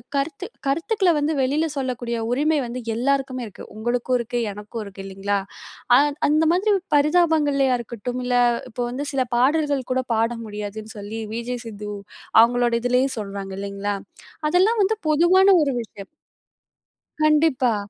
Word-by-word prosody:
கருத்து 280 +1 -2 0.2
கருத்துக்கள 350 +7 +1
வந்து 295 +2 0
வெளில 285 +5 +1
சொல்லக்கூடிய 245 -3 -2
உரிமை 300 +5 +2
வந்து 240 +2 -5 0.2
எல்லோருக்குமே 260 +1 0
இருக்கு. 205 - -11
உங்களுக்கும் 240 +3 0
இருக்கு. 240 +1 -2
எனக்கும் 210 +2 -7
இருக்கு. 200 -1 -10
இல்லைங்களா? 195 +1 -2 0.6
அ - - +6 0.3
அந்த 305 +2 +3
மாதிரி 405 +4 +2 0.2
பரிதாபங்கள்லயா 295 -4 +3
இருக்கட்டும், 240 +2 -5
இல்ல 250 0 0 0.4
இப்ப 245 - -5
வந்து 260 +4 -4
சில 270 - +1
பாடல்கள் 285 +1 +2
கூட 255 0 +1
பாட 225 +1 +1
முடியாதுன்னு 210 +1 -7
சொல்லி 210 +2 -6
'விஜே 235 +2 -3
சித்து' 210 -2 -7 0.5
அவங்களோட 240 0 +3
இதிலயும் 250 +2 +1
சொல்றாங்க 195 -2 -6
இல்லைங்களா? 200 0 -3 0.5
அதெல்லாம் 380 +8 +3
வந்து 435 +3 +1
பொதுவான 345 +5 +5 0.2
ஒரு 280 - 0
விஷயம். 205 -3 -10 1.1
கண்டிப்பா. 300 -6 +3
250 Hz, 135 wpm, -23 LUFS, 220-295 Hz, 1.1 s, அ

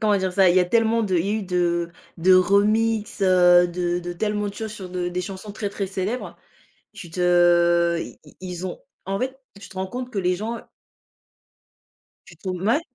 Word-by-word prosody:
comment 210 -2 +3
dire 190 -1 -1
ça? 190 -1 +4
Il 175 - +3
y - - +6
a - - +3
tellement 225 +3 +2
de 190 -4 0
il 170 +3 0
y - - -1
a - - +1
eu 220 - -2
de 175 -2 0 0.3
de 185 +2 +4
remixes, 210 +3 +2
heu, 180 -1 +5
de 175 0 -2
de 175 0 -5
tellement 210 +2 -1
de 200 - -8
choses 220 -1 -6
sur 190 -3 -8
de 180 -1 -3
des 180 +1 -3
chansons 195 +3 -7
très, 205 0 -3
très 200 0 -4
célèbres. 195 +6 -4 0.6
Tu 170 - -10
te 175 -1 +3
i - - -8
i - - -18
ils 180 -1 -5
ont 180 - -6 0.3
en 195 0 -2
fait, 265 +1 -3 0.2
tu 200 - -11
te - - -15
rends 190 0 -2
compte 250 +2 -6
que 210 - -4
les 180 -1 +1
gens 225 +3 -5 1.6
Tu - - -15
trouves 185 -2 -5
mouais, 230 - +2
185 Hz, 215 wpm, -23 LUFS, 175-210 Hz, 1.6 s, y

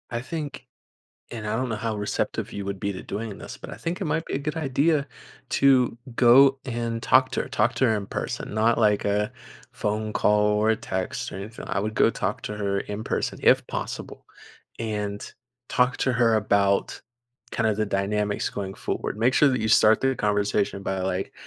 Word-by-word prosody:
I 120 -1 -3
think 145 +2 -6 0.6
and 110 -3 -6
I 110 - 0
don't 130 +2 -1
know 110 - -1
how 110 0 -2
receptive 105 0 -2
you 100 - -5
would 100 -1 -3
be 100 0 -2
to 95 - -7
doing 105 0 -5
this, - - -8
but - - -10
I - - -8
think 170 +2 -4
it - - -1
might 160 +1 -1
be - - -4
a - - 0
good 150 +2 -4
idea 150 0 +1 0.4
to 130 -4 +4 0.2
go 135 +3 +6
and 115 -2 -3
talk 130 0 +4
to - - -1
her, - - -8
talk 115 +2 +1
to 130 - +3
her 110 -2 +2
in 100 -1 -4
person, - - -4
not 110 +2 +3
like 105 -3 +3
a 105 +1 0 0.4
phone 105 +1 -2
call 105 0 +3
or 105 +1 +2
a 110 - +2
text 95 -5 -4
or - - -6
anything, 105 +4 -8
I 95 +1 0
would 110 +1 -3
go - - +4
talk 100 -2 -3
to - - -4
her 100 -1 -1
in 105 +2 -5
person, - - -2
if - - +4
possible, - - -6 0.5
and 105 -2 -3 0.5
talk 125 0 +2
to 130 - +1
her 115 -1 +3
about 100 -2 +1 0.5
kinda 110 -2 +1
the 110 +1 -1
dynamics 100 +1 -1
going 95 -1 -5
forward. - - -3
Make 120 +3 +3
sure 150 - +5
that 125 -3 0
you 110 - -1
start 110 0 +5
the 135 0 +2
conversation 105 -1 0
by, 95 -1 -2
like, 95 0 -2
110 Hz, 205 wpm, -25 LUFS, 100-125 Hz, 0.6 s, go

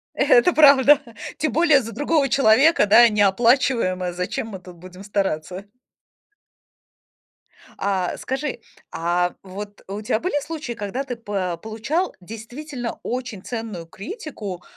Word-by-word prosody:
Это - - +4
правда. 285 -1 +7 0.4
Тем 310 -2 -1
более, 310 -1 +4
за 230 - -7
другого 290 -2 +1
человека, 270 +2 +4
да, 225 +4 +7
неоплачиваемое. 205 -3 +2
Зачем 180 +5 -3
мы 195 -4 -8
тут 180 -1 -13
будем 180 +2 -12
стараться? 195 -2 -3 2.1
А 190 -3 -1
скажи, 270 0 -4 0.3
а 175 +1 -1
вот 205 +2 -9
у 200 +2 -5
тя 215 +1 -1
были 340 -4 -1
случаи, 305 -5 -5
когда 225 +4 -4
ты 255 -2 -5
по 195 -6 -3
получал 225 - -3
действительно 240 - -7
очень 245 -6 -5
ценную 225 -8 -6
критику, 200 - -8
220 Hz, 120 wpm, -22 LUFS, 190-275 Hz, 2.1 s, правда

